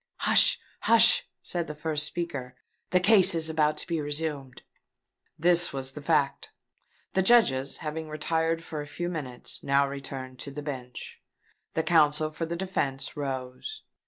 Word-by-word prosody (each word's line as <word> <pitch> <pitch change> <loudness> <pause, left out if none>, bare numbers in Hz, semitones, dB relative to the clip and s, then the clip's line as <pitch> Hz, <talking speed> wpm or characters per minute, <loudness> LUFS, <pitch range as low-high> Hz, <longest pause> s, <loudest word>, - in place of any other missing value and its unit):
"Hush! - - +6 0.2
hush!" - - +5 0.2
said 170 -2 -3
the 150 - -6
first 150 -1 -2
speaker: 140 -8 -5 0.3
"the 185 - +3
case 190 -2 +6
is 160 -1 +2
about 155 -1 +1
to - - -4
be 165 -3 -2
resumed." 145 -3 -4 0.7
This 175 +1 +3
was 135 -1 -3
the 150 - -9
fact. 145 -2 0 0.6
The 190 - +2
Judges, 160 - +3
having 155 +1 -5
retired 160 +2 -1
for 155 -2 -6
a 145 - -8
few 175 +4 -4
minutes, 140 -8 -5
had - - -13
now 140 0 +3
returned 135 -2 -7
to - - -6
the 145 +1 -7
bench. 130 -4 -7 0.5
The 160 - +1
counsel 155 -2 +3
for 165 +1 -4
the 170 - -3
defence 170 -7 -3
rose. 135 - -5
150 Hz, 160 wpm, -27 LUFS, 140-170 Hz, 0.7 s, Hush